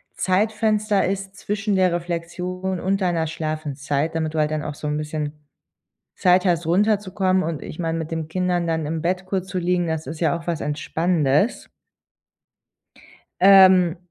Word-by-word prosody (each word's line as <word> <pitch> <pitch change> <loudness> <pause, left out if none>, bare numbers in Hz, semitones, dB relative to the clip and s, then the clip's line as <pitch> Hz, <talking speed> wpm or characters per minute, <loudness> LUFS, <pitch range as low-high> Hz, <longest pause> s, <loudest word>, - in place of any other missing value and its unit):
Zeitfenster 210 +1 +1
ist 195 0 -4
zwischen 205 0 -2
der 185 -2 +3
Reflexion 180 +2 -3
und 195 +2 0
deiner 175 -4 0
Schlafenszeit, 155 -1 -3
damit 160 -1 -1
du 160 - -1
halt 150 0 +2
dann 155 -1 -2
auch 150 - -4
so 150 - -6
'n 150 0 -1
bisschen 150 -1 -4 0.8
Zeit 180 +1 +3
hast, 170 -2 +1
runterzukommen 190 +1 +1
und 160 -3 -4
ich - - -8
meine, 165 -1 -1
mit 160 -1 -5
den 160 -1 -3
Kindern 180 0 0
dann 160 -2 -1
im 160 +1 -3
Bett 185 +2 -1
kurz 190 -1 -3
zu 185 - -3
liegen, 175 0 0
das 160 -1 -3
ist 155 +3 -7
ja 165 - +2
auch 165 - -13
was 170 -2 -2
Entspannendes. 155 - 0 1.7
Ähm, 185 -2 +7
175 Hz, 160 wpm, -22 LUFS, 160-190 Hz, 1.7 s, Ähm